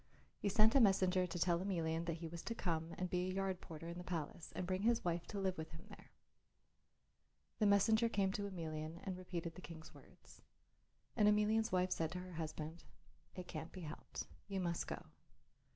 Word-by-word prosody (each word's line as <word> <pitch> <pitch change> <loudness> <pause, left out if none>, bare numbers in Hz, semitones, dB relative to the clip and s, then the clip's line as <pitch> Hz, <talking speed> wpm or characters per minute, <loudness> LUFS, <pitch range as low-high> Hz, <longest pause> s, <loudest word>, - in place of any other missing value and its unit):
He 200 - +1
sent 215 +2 +6
a 275 - +7
messenger 185 -4 +5
to 175 - -4
tell 170 0 +3
Emelian 165 -3 0
that 165 - 0
he 165 0 -5
was 170 +1 -6
to 230 - -2
come 165 -5 -1
and 185 - 0
be 180 0 0
a - - -1
yard 190 -1 0
porter 165 0 -8
in 170 +1 -5
the - - -5
palace 170 -1 -4
and 185 - -1
bring 185 +1 0
his 230 -1 +3
wife 170 0 0
to 205 - -5
live 190 -3 0
with 160 - -4
him 160 +2 -10
there. - - -13 1.5
The 210 - +5
messenger 220 +3 +5
came 195 -3 +2
to 200 +1 -2
Emelian 160 -2 -4
and 190 -2 -2
repeated 175 -2 -4
the 180 - -10
King's 160 -3 -9
words. - - -16 0.7
And 210 -3 +5
Emelian's 210 +1 +4
wife 185 0 +2
said 165 -3 +1
to 180 - -3
her 185 0 -8
husband, 160 0 -4 0.5
"It 180 -1 -6
can't 160 0 -5
be 185 - -8
helped; 155 -2 -6 0.2
you 195 -2 -2
must 170 -2 -1
go. - - -5
180 Hz, 200 wpm, -39 LUFS, 165-195 Hz, 1.5 s, a